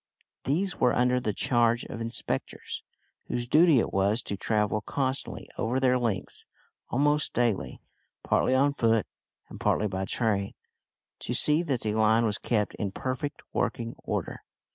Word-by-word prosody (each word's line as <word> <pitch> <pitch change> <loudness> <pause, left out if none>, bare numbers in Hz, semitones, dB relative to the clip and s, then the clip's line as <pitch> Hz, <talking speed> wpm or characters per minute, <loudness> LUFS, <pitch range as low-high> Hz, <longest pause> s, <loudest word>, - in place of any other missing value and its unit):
These 175 +5 +1
were 125 - +3
under 125 +1 +3
the 110 - -1
charge 120 +2 +2
of 115 - -7
inspectors, 115 0 -3 0.5
whose 120 0 -3
duty 160 +2 +5
it 115 - 0
was 100 +4 +2
to 100 - -3
travel 105 +1 0
constantly 135 +3 -3
over 120 +4 0
their 125 -1 +3
lengths 115 -6 -3 0.4
almost 145 +3 +1
daily 120 -5 0 0.4
partly 130 - +2
on 140 +2 +3
foot 115 -5 +2 0.4
and - - -11
partly 105 - +1
by 95 -1 -3
train, 100 -3 -1 0.6
to - - -2
see 150 +2 +4
that 140 -8 -1
the 105 - -1
line 110 +1 +3
was 105 -1 0
kept 105 -3 0
in 100 -2 -2
perfect 130 +6 -4
working 115 -1 -1
order. - - -4
120 Hz, 150 wpm, -28 LUFS, 110-130 Hz, 0.6 s, duty